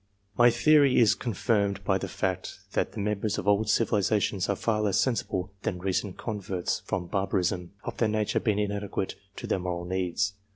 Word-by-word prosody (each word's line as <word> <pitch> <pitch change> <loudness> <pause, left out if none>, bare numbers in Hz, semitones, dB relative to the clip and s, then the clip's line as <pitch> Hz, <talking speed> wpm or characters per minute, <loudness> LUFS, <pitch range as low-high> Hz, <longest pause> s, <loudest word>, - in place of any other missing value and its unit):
My 120 0 +6
theory 145 +1 +4
is 115 -2 +6
confirmed 100 -3 0
by 95 +1 +1
the - - -4
fact 95 -1 -3
that - - -1
the - - -6
members 105 0 -1
of 95 - -4
old 105 +1 +3
civilizations 105 -2 +1
are 100 - +2
far 110 +1 0
less 105 -3 +2
sensible 95 -7 -1
than 90 - -2
recent 95 +1 -2
converts 100 -5 -3
from 90 - -2
barbarism, 95 -1 -1
of - - -5
their 115 - +2
nature 105 -1 0
being 105 -3 0
inadequate 100 -2 -2 0.2
to - - -6
their - - 0
moral 90 -1 -3
needs. 95 +2 -1
100 Hz, 175 wpm, -28 LUFS, 95-110 Hz, 0.2 s, My